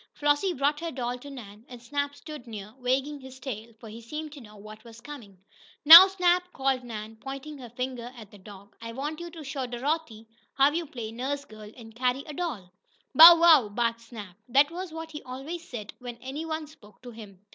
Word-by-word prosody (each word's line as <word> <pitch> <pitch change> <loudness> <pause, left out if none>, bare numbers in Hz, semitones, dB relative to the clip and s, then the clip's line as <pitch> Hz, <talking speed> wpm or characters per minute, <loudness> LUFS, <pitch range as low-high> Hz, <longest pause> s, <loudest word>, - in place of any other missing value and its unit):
Flossie 290 +6 +1
brought 285 +1 0
her 335 0 -4
doll 250 -3 -4
to 285 - -11
Nan, 220 -6 -11
and 245 -1 -10
Snap 285 +4 -3
stood 300 -6 -11
near, 210 -2 -9
wagging 265 +4 -1
his 260 0 -12
tail, 235 -4 -7
for 225 - -12
he 220 +2 -10
seemed 300 +6 -7
to 290 -2 -11
know 210 -2 -15
what 215 +1 -13
was 230 -1 -14
coming. 230 -8 -12 0.5
"Now, 335 +5 +12
Snap," 360 -2 +1
said 265 -2 0
Nan, 220 -2 -8
pointing 275 +4 -8
her 245 -2 -10
finger 245 0 -5
at 215 -3 -12
the 205 - -15
dog, 200 +1 -15
"I 230 0 -7
want 295 +5 -5
you 345 0 -7
to 325 -2 -11
show 270 -2 -5
Dorothy 245 -2 -3 0.3
how 275 +1 +4
you 330 +1 -3
play 230 -5 -7
nurse 275 +5 -4
girl, 215 -1 -12
and 225 -2 -13
carry 250 +3 -1
a 300 - -8
doll." 245 - -5 0.4
"Bow 330 +4 +10
wow!" 315 -10 +6
barked 230 +2 -2
Snap. 215 -6 -11
That 280 +5 +4
was 360 0 -6
what 325 0 -8
he 300 - -8
always 280 +7 -8
said 215 -4 -8
when 245 -1 -8
any 275 +6 -7
one 315 -1 -4
spoke 245 -8 -19
to 245 - -9
him. 205 -4 -13
260 Hz, 210 wpm, -27 LUFS, 225-300 Hz, 0.5 s, Now